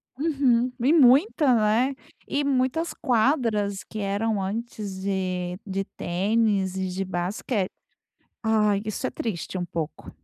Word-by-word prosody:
Uhum, 260 -5 +2
e 270 +7 +3
muita, 285 - +5 0.3
né? 275 - -5 0.3
E 285 +1 0
muitas 280 +5 0
quadras 220 -5 +1
que 215 - -8
eram 205 +1 0
antes 205 -1 -4
de 185 -2 -2
de 195 0 -2
tênis 195 +1 +1
e 190 -1 -1
de 185 +2 -2
basque 190 +3 -2 0.8
Ah, 220 -2 +3
isso 215 - -3
é - - -2
triste, 185 -4 -4
um 180 - -2
pouco. 165 -3 -5
215 Hz, 130 wpm, -25 LUFS, 190-250 Hz, 0.8 s, muita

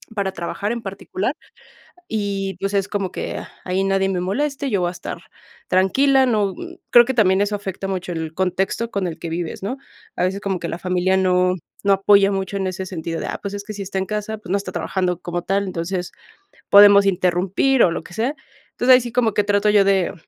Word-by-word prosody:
para 195 -2 -1
trabajar 190 +4 -3
en 235 - -5
particular. 195 +4 -3 0.8
Y, 200 -3 -2
pues, 195 +1 -2
es 195 -1 +1
como 200 -3 -2
que, - - -4
ah, - - -9
ahí 185 +1 0
nadie 195 0 +1
me 185 -2 -1
moleste, 275 +9 -2
yo 200 -4 +1
voy 175 - +1
a 175 - -4
estar 180 - -7 0.5
tranquila. 265 +9 +3
No, 210 -5 +1
mm, 350 0 -9
creo 240 0 +8
que 265 - -1
también 195 -5 +3
eso 205 0 +1
afecta 195 -1 -5
mucho 185 -2 -3
el 160 -1 -4
contexto 190 +5 -1
con 195 -2 -1
el 160 - -7
que 170 - -6
vives, 170 +2 -4
¿no? 255 +7 -3 0.4
A - - -1
veces 195 +2 -1
como 195 -2 -2
que 170 - -4
la 165 - -4
familia 185 +1 +1
no 185 -1 +2 0.3
no 200 - +4
apoya 200 0 +4
mucho 195 0 -3
en 190 - -2
ese 185 0 -5
sentido 165 -2 -4
de - - -4
ah, - - -4
pues 200 0 -5
es 205 0 -5
que 215 - -7
si 200 - -5
está 190 0 -4
en 190 - -1
casa, 210 +1 -4
pues 205 - -12
no 200 - +3
está 200 - -6
trabajando 180 -2 -1
como 175 0 -4
tal, 195 +2 0
entonces, 180 0 -4 0.6
podemos 200 0 +8
interrumpir 190 +7 +2
o - - +5
lo - - -4
que - - -13
sea. 235 +9 -1 0.4
Entonces, 255 +1 +5
ahí 250 - +4
sí 240 -1 -6
como 235 -4 +2
que 210 - +2
trato 205 0 +2
yo 205 -1 +5
de 195 -2 +2
195 Hz, 230 wpm, -21 LUFS, 185-205 Hz, 0.8 s, creo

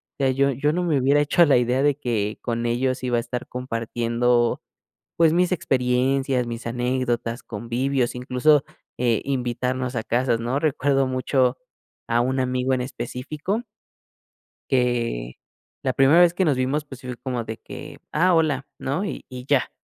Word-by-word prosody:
O - - -68
sea, 135 -2 +2
yo 140 +1 +2
yo 145 +4 0
no 180 +1 0
me 155 -6 +2
hubiera 140 +3 +3
hecho 165 +4 +4
la 140 -4 +5
idea 125 +2 +1
de 145 -2 +3
que 110 -5 -2
con 115 -1 -2
ellos 130 +2 0
iba 125 -1 +1
a - - +3
estar 125 0 -5
compartiendo, 120 0 0 0.6
pues 165 -1 +5
mis 180 +1 +2
experiencias, 130 -3 +1
mis 115 0 -6
anécdotas, 120 -1 -1
convivios, 120 +3 -1
incluso 125 +4 +3 0.3
eh, 120 -3 +1
invitarnos 125 -1 -2
a 110 - -1
casas, 120 0 +1
¿no? 120 +4 -1
Recuerdo 140 -2 +1
mucho 130 0 +1 0.5
a 120 +1 +2
un 130 +2 0
amigo 130 0 0
en 125 - 0
específico 145 - -4 1.1
que 120 - 0 0.5
la 130 - +1
primera 140 +7 +5
vez 175 -1 +5
que 185 0 +1
nos 145 - +3
vimos, 135 +4 -1
pues, 135 -2 -11
si 130 - -9
fue 125 - -5
como 125 -2 -3
de 110 0 -6
que: - - -10
"Ah, 180 +4 +3
hola", 150 -5 +1
¿no?, 145 +8 -2
y - - -5
y 125 -1 -8
ya. 140 -2 +2
130 Hz, 170 wpm, -23 LUFS, 120-140 Hz, 1.1 s, la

